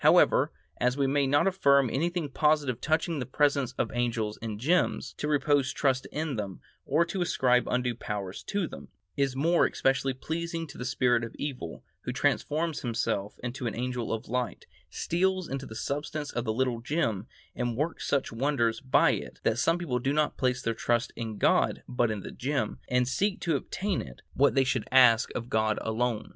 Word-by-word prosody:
However, -, -, +5 dB, 0.3 s
as 125 Hz, +2 st, +1 dB
we 140 Hz, -, +2 dB
may 140 Hz, 0 st, +2 dB
not 145 Hz, +2 st, +3 dB
affirm 140 Hz, -8 st, +4 dB
anything 170 Hz, +3 st, 0 dB
positive 145 Hz, -3 st, +1 dB
touching 160 Hz, 0 st, 0 dB
the 125 Hz, -, -2 dB
presence 140 Hz, -2 st, +1 dB
of -, -, -2 dB
angels 115 Hz, -3 st, -1 dB
in 110 Hz, -2 st, -4 dB
gems, 145 Hz, +1 st, +1 dB
to 150 Hz, -, -1 dB
repose 145 Hz, -2 st, +2 dB
trust 130 Hz, -2 st, 0 dB
in 150 Hz, -4 st, -2 dB
them, 100 Hz, -3 st, -4 dB, 0.3 s
or 160 Hz, +5 st, +3 dB
to 185 Hz, +2 st, -3 dB
ascribe 125 Hz, -7 st, +2 dB
undue 125 Hz, -1 st, +1 dB
powers 105 Hz, -5 st, -5 dB
to 200 Hz, -3 st, -1 dB
them, -, -, -10 dB, 0.3 s
is 135 Hz, -2 st, 0 dB
more 165 Hz, +5 st, +3 dB
especially 135 Hz, 0 st, +1 dB
pleasing 165 Hz, +4 st, -3 dB
to 150 Hz, -, -12 dB
the 125 Hz, -, -4 dB
spirit 125 Hz, -2 st, +2 dB
of 115 Hz, -, -6 dB
evil, 130 Hz, -, -5 dB, 0.2 s
who -, -, -4 dB
transforms 160 Hz, +1 st, 0 dB
himself 110 Hz, -4 st, -2 dB
into 125 Hz, 0 st, -3 dB
an 110 Hz, -, -3 dB
angel 125 Hz, 0 st, -2 dB
of 110 Hz, -1 st, -3 dB
light, 125 Hz, 0 st, -2 dB, 0.2 s
steals 185 Hz, +1 st, 0 dB
into 135 Hz, 0 st, -4 dB
the 110 Hz, -, -9 dB
substance 145 Hz, +4 st, -3 dB
of 120 Hz, 0 st, -3 dB
the 110 Hz, -, 0 dB
little 125 Hz, -1 st, 0 dB
gem, 115 Hz, -, -1 dB, 0.3 s
and 120 Hz, -2 st, -2 dB
works 155 Hz, +4 st, -2 dB
such 140 Hz, -, 0 dB
wonders 115 Hz, -2 st, +1 dB
by 130 Hz, -1 st, +4 dB
it -, -, -5 dB
that 115 Hz, +2 st, +1 dB
some 165 Hz, +8 st, +3 dB
people 145 Hz, -8 st, -2 dB
do 135 Hz, +4 st, 0 dB
not 150 Hz, 0 st, +1 dB
place 125 Hz, -2 st, 0 dB
their 115 Hz, -, 0 dB
trust 120 Hz, +1 st, 0 dB
in 110 Hz, -2 st, -5 dB
God -, -, +2 dB
but 120 Hz, -2 st, +1 dB
in 105 Hz, -3 st, -4 dB
a -, -, -6 dB
gem, 140 Hz, +2 st, -2 dB
and 125 Hz, 0 st, +2 dB
seek 195 Hz, +9 st, 0 dB
to 165 Hz, -3 st, +1 dB
obtain 190 Hz, +7 st, -2 dB
from -, -, -5 dB
it -, -, -13 dB
what 140 Hz, +1 st, +3 dB
they 135 Hz, -, +5 dB
should 125 Hz, -4 st, -1 dB
ask 125 Hz, -3 st, +6 dB
of 115 Hz, -, -3 dB
God 110 Hz, -2 st, +1 dB
alone. 115 Hz, 0 st, -1 dB
130 Hz, 195 wpm, -28 LUFS, 120-150 Hz, 0.3 s, ask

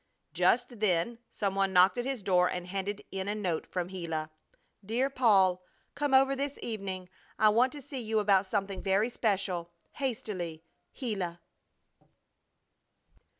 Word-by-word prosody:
Just 245 Hz, -1 st, +2 dB
then 205 Hz, +3 st, +1 dB
some 200 Hz, -2 st, -2 dB
one 195 Hz, -1 st, +1 dB
knocked 180 Hz, +1 st, +6 dB
at 245 Hz, 0 st, -2 dB
his 265 Hz, -6 st, -3 dB
door 180 Hz, -2 st, +3 dB
and 180 Hz, -1 st, -4 dB
handed 195 Hz, +2 st, -4 dB
in 190 Hz, 0 st, -3 dB
a 205 Hz, -, -1 dB
note 185 Hz, -6 st, -2 dB
from 180 Hz, -1 st, -3 dB
Gila. 165 Hz, -4 st, -4 dB, 0.5 s
DEAR 240 Hz, +7 st, 0 dB
PAUL, 195 Hz, -8 st, +4 dB, 0.3 s
Come 290 Hz, -2 st, +1 dB
over 270 Hz, +1 st, +5 dB
this 280 Hz, +1 st, -3 dB
evening, 195 Hz, -5 st, -4 dB, 0.3 s
I 215 Hz, -, +6 dB
want 240 Hz, +5 st, +4 dB
to 290 Hz, -2 st, -8 dB
see 270 Hz, -1 st, -5 dB
you 220 Hz, -1 st, -1 dB
about 200 Hz, -2 st, +3 dB
something 195 Hz, -1 st, -2 dB
very 200 Hz, +4 st, +2 dB
special. 190 Hz, -7 st, -1 dB, 0.2 s
Hastily, 210 Hz, -, -4 dB, 0.3 s
GILA. 195 Hz, -9 st, -2 dB
200 Hz, 145 wpm, -30 LUFS, 185-240 Hz, 0.5 s, knocked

